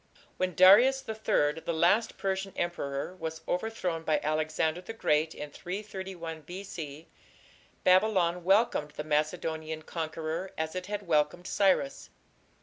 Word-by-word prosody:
When 185 -2 -1
Darius 240 - +7
III, 165 -9 +1
the 170 - -2
last 180 +8 +3
Persian 195 0 -2
emperor, 170 -2 -3
was 160 -1 -5
overthrown 180 -4 -2
by 155 -1 +1
Alexander 155 +2 0
the 225 - -7
Great 155 -7 +1
in 150 0 -7
331 185 -3 -6
B.C., 165 -3 -8 0.8
Babylon 185 -2 +3
welcomed 195 -5 +3
the 150 - -4
Macedonian 155 +1 -1
conqueror 160 +2 -4
as 160 0 -2
it 185 0 -5
had 205 0 -4
welcomed 155 +1 +1
Cyrus. 200 +9 +1
175 Hz, 125 wpm, -29 LUFS, 155-195 Hz, 0.8 s, Darius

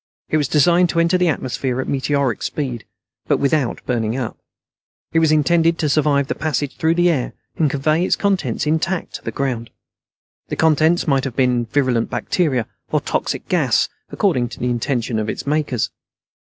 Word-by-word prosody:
It 155 - +2
was 150 - +1
designed 170 +4 +4
to 170 - 0
enter 170 +2 +3
the 180 -1 +3
atmosphere 130 -3 -1
at 130 - -2
meteoric 140 -3 0
speed, 130 -6 -3 0.4
but - - +3
without 140 -2 0
burning 115 -1 -1
up. 125 -4 -3 0.8
It 165 - +4
was 160 -1 +3
intended 165 +2 +3
to 155 - 0
survive 145 -1 +2
the - - -2
passage 150 -2 -2
through 160 +1 +1
the 175 0 +4
air 130 -6 -2 0.2
and 155 -3 +2
convey 155 +5 +1
its - - +2
contents 200 -5 0
intact 160 +4 -1
to - - -22
the - - -3
ground. 125 -4 -2 0.8
The - - -3
contents 160 +2 +3
might 135 -3 +2
have 130 -3 -4
been 125 -2 +2
virulent 125 -2 +1
bacteria 135 -10 0 0.3
or - - +3
toxic - - -3
gas, - - +2 0.2
according 120 -2 +1
to - - -10
the 125 0 0
intentions 120 -1 -1
of 110 0 -2
its - - -4
makers. 145 -5 0
145 Hz, 180 wpm, -20 LUFS, 125-160 Hz, 0.8 s, designed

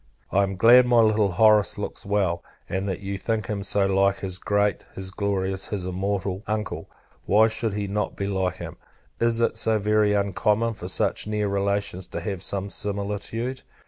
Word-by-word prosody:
I 100 - +3
am 95 -1 -1
glad 120 +5 +7
my 120 -1 +4
little 110 -3 +3
Horace 105 0 +4
looks - - -5
so - - -11
well; 95 -4 +1 0.2
and 95 +2 -2
that 95 - -4
you 100 0 -4
think 110 +1 -1
him 100 -1 -3
so 100 0 +1
like 95 0 +2
his 95 -1 -4
great, 100 0 +1
his 95 0 -5
glorious, 95 -1 -1
his 100 -4 -4
immortal 95 +1 -2
Uncle. 105 -1 -3 0.4
Why 105 +3 +5
should 110 -1 -1
he 105 -1 -2
not 105 +1 -2
be 100 - -3
like 95 -3 -1
him? - - -8 0.4
Is 115 0 +1
it 115 -1 +1
so 110 -1 +2
very 105 0 +2
uncommon 105 +3 +1
for 90 -5 -8
such 95 - -1
near 105 -1 -1
relations 100 -2 -1
to - - -5
have 90 +1 -4
some 100 0 -2
similitude? 105 +5 -3
100 Hz, 185 wpm, -25 LUFS, 95-105 Hz, 0.4 s, glad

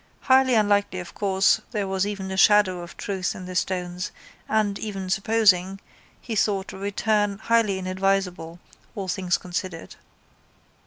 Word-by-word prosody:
Highly 260 -1 +4
unlikely 205 -3 +2
of 175 -1 -8
course 195 -1 +2
there 205 -4 -2
was 190 +1 0
even 195 -2 -5
a - - -3
shadow 195 -2 +4
of 175 - -11
truth 190 -2 -3
in 185 - -8
the 185 - -7
stones 180 -1 -2 0.4
and, 210 -2 +1
even 195 -3 -5
supposing, 195 -3 +2 0.4
he 230 - -5
thought 200 -2 0
a - - -8
return 205 0 0
highly 225 -3 +1
inadvisable, 185 -3 -1 0.4
all 195 -3 -4
things 180 0 0
considered. 180 -1 -6
195 Hz, 145 wpm, -24 LUFS, 185-205 Hz, 0.4 s, Highly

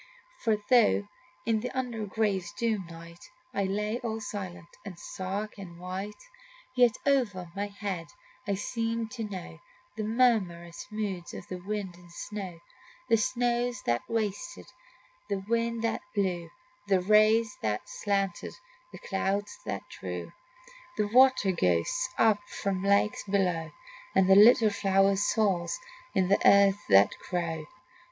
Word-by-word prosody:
For 220 -2 +2
though 225 -4 +5 0.4
in 225 -1 +2
the 250 +3 -3
under 235 -5 -2
grave's 200 -3 -1
doom 210 -4 -1
night 170 0 -12 0.2
I 200 - 0
lay 210 +4 -1
all 225 -3 -3
silent 190 -5 -6
and 190 -4 -8
stark 200 +4 -5
and 175 -3 -10
white, 190 +3 -6 0.5
Yet 245 -3 +5
over 210 -11 +1
my 200 +1 -2
head 200 -4 -5 0.4
I 200 - +1
seemed 225 +2 -2
to 240 -3 -5
know 195 -4 -7 0.4
The 215 - -3
murmurous 210 -8 +1
moods 205 -5 -4
of - - -9 0.2
wind 205 -4 -3
and 175 -1 -17
snow, 190 -2 -6 0.5
The 225 - +5
snows 245 +1 0
that 120 0 +1
wasted, 230 +3 -3 0.6
the 195 -1 -2
winds 230 0 0
that 230 - 0
blew, 180 -4 -1 0.4
The 190 -2 +3
rays 215 +2 +4
that 105 -1 -2
slanted, 195 -3 -2 0.4
the - - -9
clouds 200 - -2
that - - -3
drew - - -6 0.7
The 210 -1 +1
water 255 -4 +5
ghosts 170 - +1
up 220 -2 +4
from 195 -2 -2
lakes 200 +1 +2
below, 185 -5 0 0.5
And 190 - +5
the 190 - +7
little 220 +1 +7
flower 195 -1 +3
souls 195 - +1 0.4
in 190 +1 +4
earth 200 +1 +6
that 100 0 +7 0.2
grow. 165 -3 -2
205 Hz, 135 wpm, -29 LUFS, 185-225 Hz, 0.7 s, the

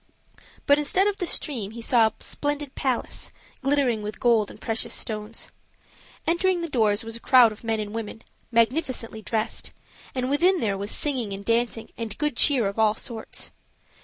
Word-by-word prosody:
But 285 +1 +5
instead 365 +6 +2
of 410 -1 0
the 360 - -1
stream 240 -11 0
he 230 +2 -8
saw 230 -2 +5
a - - -4
splendid 290 -1 -2
palace, 260 -3 -2 0.3
glittering 270 -5 +2
with 210 0 -6
gold 230 -4 +3
and - - -12
precious 225 0 -1
stones. 215 +1 -4 0.7
Entering 350 +1 +2
the 335 - -3
doors 220 -4 +2
was 225 0 -5
a - - -5
crowd 245 -2 +6
of 215 - -11
men 225 -1 0
and 210 0 -4
women, 225 0 -5 0.3
magnificently 230 -1 0
dressed; 220 +1 -2 0.5
and 255 -1 0
within 350 +7 +3
there 210 -5 0
was 200 +2 -5
singing 255 -9 0
and 200 +1 -7
dancing 230 -1 0
and 225 -2 -5
good 300 -3 -1
cheer 250 -5 +4
of 200 +3 -4
all 215 -1 +4
sorts. 225 -1 -5
230 Hz, 175 wpm, -25 LUFS, 220-285 Hz, 0.7 s, crowd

